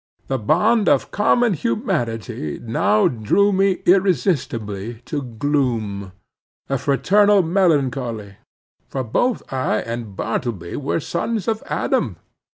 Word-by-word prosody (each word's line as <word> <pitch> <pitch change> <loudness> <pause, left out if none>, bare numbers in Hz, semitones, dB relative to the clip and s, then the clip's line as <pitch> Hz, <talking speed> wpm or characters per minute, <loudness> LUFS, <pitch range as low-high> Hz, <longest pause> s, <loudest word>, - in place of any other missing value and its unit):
The 135 -1 0
bond 205 - +3
of - - +4
a - - -19
common 225 +2 +2
humanity 120 - -2
now 105 -2 +2
drew 165 - +2
me 195 0 +1
irresistibly 125 - +1
to 145 +2 -3
gloom. 115 -6 -2 0.6
A 135 -1 0
fraternal 195 - +3
melancholy! 135 - 0 0.5
For 135 - -3
both 225 - 0
I 130 -4 0
and 115 -3 -6
Bartleby 110 -6 -3
were 145 +3 -1
sons 205 +6 -2
of 220 -1 0
Adam. - - -1
135 Hz, 115 wpm, -21 LUFS, -, 0.6 s, of